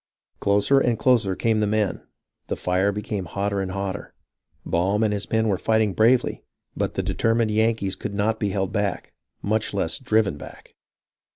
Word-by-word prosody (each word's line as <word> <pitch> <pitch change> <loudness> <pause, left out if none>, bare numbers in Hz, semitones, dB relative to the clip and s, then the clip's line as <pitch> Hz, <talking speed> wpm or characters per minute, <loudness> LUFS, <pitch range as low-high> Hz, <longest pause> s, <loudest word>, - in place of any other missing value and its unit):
Closer 100 +7 +3
and 120 -4 +1
closer 115 -7 +2
came 110 +1 +1
the 105 - +1
men; 105 -2 0 0.5
the - - -2
fire 95 +3 +1
became 105 -1 -4
hotter 100 +3 -2
and 95 - -3
hotter. 95 +1 -5 0.5
Baum 95 +5 +1
and 105 -1 +2
his 100 -1 -3
men 110 0 +1
were 95 -3 +1
fighting 110 -2 +2
bravely, 120 +5 +2 0.3
but - - -2
the - - -1
determined 115 -1 +1
Yankees 110 -3 +1
could 100 - -5
not 110 +2 0
be 105 - 0
held 95 0 -1
back, 105 -2 -2 0.3
much 105 0 -1
less 80 -5 -1
driven 110 -5 +1
back. - - -12
105 Hz, 170 wpm, -24 LUFS, 100-110 Hz, 0.5 s, Closer